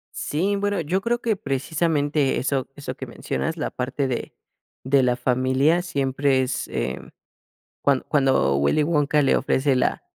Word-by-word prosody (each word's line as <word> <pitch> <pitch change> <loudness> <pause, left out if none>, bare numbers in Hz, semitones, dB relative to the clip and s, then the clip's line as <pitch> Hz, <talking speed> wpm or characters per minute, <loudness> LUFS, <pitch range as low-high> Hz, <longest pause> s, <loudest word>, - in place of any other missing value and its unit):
Sí, 190 +7 -1
bueno, 205 -1 0
yo 170 +4 -1
creo 235 +3 -1
que 225 -3 0
precisamente 145 -1 0
eso, 135 0 -1
eso 140 -3 -7
que 130 - -7
mencionas, 160 +6 -3
la 155 - -3
parte 135 +2 -2
de 125 - -4 0.5
de 135 +1 +3
la 125 -1 +2
familia, 130 +6 +2
siempre 135 -4 +1
es, 130 0 -2
eh, 65 +1 -3 0.8
cuando 140 -2 +1
cuando 135 - +2
Willy 70 - +2
Wonka 150 -1 +2
le 135 - +3
ofrece 135 0 +1
la 125 - 0
140 Hz, 155 wpm, -23 LUFS, 130-160 Hz, 0.8 s, de